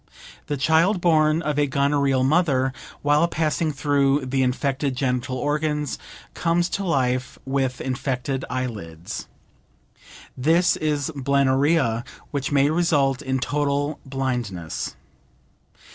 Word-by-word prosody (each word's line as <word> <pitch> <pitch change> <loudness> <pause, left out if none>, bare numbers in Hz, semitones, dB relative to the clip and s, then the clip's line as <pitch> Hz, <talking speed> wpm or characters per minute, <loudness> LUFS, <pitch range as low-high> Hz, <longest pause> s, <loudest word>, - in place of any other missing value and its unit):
The 145 - -2
child 165 +7 +3
born 160 -1 +3
of 150 -2 -1
a 145 - +3
gonorrheal 140 -1 +2
mother, 135 -3 +2 0.3
while 145 +3 +4
passing 160 -1 0
through 140 -1 +1
the 135 +1 0
infected 135 +1 0
genital 130 0 -1
organs, 150 +1 -1 0.3
comes 175 +1 +1
to 200 - -2
life 130 -7 0
with 135 -1 -1
infected 130 0 -2
eyelids. 105 -11 -5 1.1
This 165 +7 +3
is 150 -1 -1
Blennorrhea, 140 -2 +2 0.3
which 140 -1 -2
may 140 +1 +3
result 145 -5 +2
in 130 -2 -1
total 145 +2 -1
blindness. 125 - -3
140 Hz, 110 wpm, -23 LUFS, 130-150 Hz, 1.1 s, while